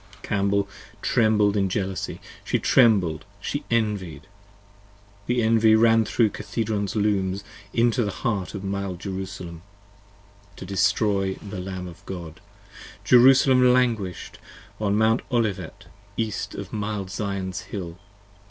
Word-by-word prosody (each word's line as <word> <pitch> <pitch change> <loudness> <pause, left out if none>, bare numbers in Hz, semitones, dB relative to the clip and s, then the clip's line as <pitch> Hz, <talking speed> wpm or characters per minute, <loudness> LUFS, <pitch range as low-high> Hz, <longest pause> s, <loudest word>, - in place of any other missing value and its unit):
Cambel 100 -1 +1 0.4
trembled 105 -3 +3
with 100 -2 +1
jealousy: 95 0 -3 0.2
she - - 0
trembled! 95 - +3 0.2
she 145 +8 -3
envied! 105 -8 -1 1.0
The 120 -1 +1
envy 110 0 +5
ran 115 0 +4
thro' 115 +2 +2
Cathedron's 105 -1 -3
Looms 100 -2 0 0.3
into 120 +1 +2
the 105 - -1
Heart 100 -1 -3
Of 100 - -5
mild 100 -2 -3
Jerusalem, 95 -3 -6 0.9
to - - -9
destroy 95 +1 +1
the 100 -2 -8
Lamb 90 0 -5
of 85 - -12
God. 85 -4 -7 0.6
Jerusalem 125 +2 +6
Languish'd 115 -8 -1 0.4
upon 105 -1 0
Mount 110 +2 +3
Olivet, 115 -5 -2 0.3
East 105 -3 -3
of 100 - -7
mild 105 -3 -3
Zion's 100 -2 -3
Hill. 90 -4 -7
100 Hz, 115 wpm, -24 LUFS, 95-110 Hz, 1.0 s, Jerusalem